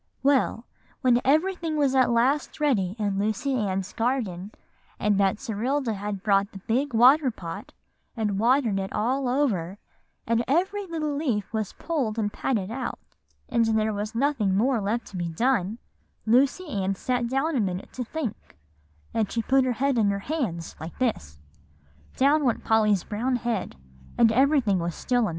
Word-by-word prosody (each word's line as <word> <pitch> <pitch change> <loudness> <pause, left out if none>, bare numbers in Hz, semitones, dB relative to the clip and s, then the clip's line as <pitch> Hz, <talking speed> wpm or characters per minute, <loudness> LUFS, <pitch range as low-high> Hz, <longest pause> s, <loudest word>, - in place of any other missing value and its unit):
"Well, 270 -4 +2 0.4
when 245 -1 +4
everything 320 +2 +1
was 280 -3 +2
at 260 -2 +4
last 255 +7 +1
ready 210 -11 +1
in 200 -3 -1
Lucy 220 +7 -1
Ann's 195 -5 -2
Garden, 220 -6 -2 0.5
and 210 0 +2
Betserilda 220 +6 0
had 200 -1 -5
brought 200 0 +2
the - - -7
big 240 +7 -1
water 260 +5 +6
pot, 190 -3 -7 0.5
and 210 -3 -1
watered 235 -3 +2
it 190 0 -4
all 255 +4 0
over, 205 - 0 0.5
and 230 +1 +1
every 380 +7 0
little 310 -3 -2
leaf 245 -9 -2
was 215 -3 -2
pulled 265 -10 -2
and 205 -2 -1
patted 215 -6 -1
out, 255 +1 -4 0.5
and 235 -2 +2 0.5
nothing 230 -7 +1
more 250 +4 +2
was 210 - -3
left 230 +2 -1
to 190 - -6
be 175 -1 -2
done, 220 +2 0 0.5
Lucy 265 +10 +3
Ann 195 -7 -1
sat 245 +3 -1
down 275 +5 0
a - - +2
minute 190 -3 -3
to 255 - -3
think, 235 - -6 0.6
and 215 -3 0
she 230 - -1
put 265 +3 +3
her 255 - +1
head 265 +1 +1
in 205 -2 +3
her 200 - 0
hands, 220 - -3
like 160 +2 -8
this;" 140 - -2 0.8
down 290 +3 +3
went 245 -4 0
Polly's 215 -4 +3
brown 240 +5 -1
head, 235 -5 -2 0.4
and 230 -2 +5
everything 260 -5 +3
was 170 -1 -3
still 245 -1 0
a 235 - +2
minute. - - -1
235 Hz, 165 wpm, -26 LUFS, 205-270 Hz, 0.8 s, water